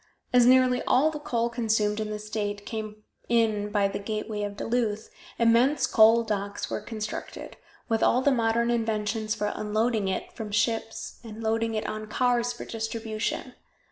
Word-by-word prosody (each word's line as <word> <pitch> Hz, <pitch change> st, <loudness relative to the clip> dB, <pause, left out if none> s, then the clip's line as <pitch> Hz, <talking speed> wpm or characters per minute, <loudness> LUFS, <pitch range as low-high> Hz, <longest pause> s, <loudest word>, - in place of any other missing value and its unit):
As 245 Hz, -1 st, +6 dB
nearly 255 Hz, 0 st, +5 dB
all 295 Hz, +5 st, +4 dB
the 300 Hz, -, -6 dB
coal 235 Hz, -6 st, -1 dB
consumed 220 Hz, -3 st, 0 dB
in 215 Hz, -1 st, -2 dB
the 210 Hz, -, -3 dB
state 210 Hz, -1 st, -4 dB
came 215 Hz, -1 st, -6 dB, 0.3 s
in 220 Hz, -3 st, +2 dB
by 205 Hz, -1 st, +2 dB
the 195 Hz, -, -4 dB
gateway 215 Hz, 0 st, -4 dB
of 205 Hz, 0 st, -4 dB
Duluth, 225 Hz, -2 st, -1 dB, 0.3 s
immense 235 Hz, +5 st, +4 dB
coal 225 Hz, +1 st, +5 dB
docks 205 Hz, -2 st, -3 dB
were -, -, -2 dB
constructed, 215 Hz, 0 st, -6 dB, 0.3 s
with 225 Hz, -1 st, 0 dB
all 250 Hz, +2 st, +3 dB
the 285 Hz, -, +4 dB
modern 235 Hz, -1 st, +2 dB
inventions 220 Hz, -1 st, -1 dB
for 210 Hz, 0 st, -2 dB
unloading 215 Hz, 0 st, 0 dB
it 190 Hz, -, -3 dB
from 220 Hz, -2 st, -6 dB
ships 225 Hz, +1 st, -1 dB
and 225 Hz, -1 st, -8 dB
loading 225 Hz, 0 st, 0 dB
it 215 Hz, -, -2 dB
on 215 Hz, 0 st, -4 dB
cars 245 Hz, +1 st, +1 dB
for 240 Hz, -, -8 dB
distribution. 225 Hz, -1 st, -3 dB
220 Hz, 165 wpm, -27 LUFS, 210-235 Hz, 0.3 s, As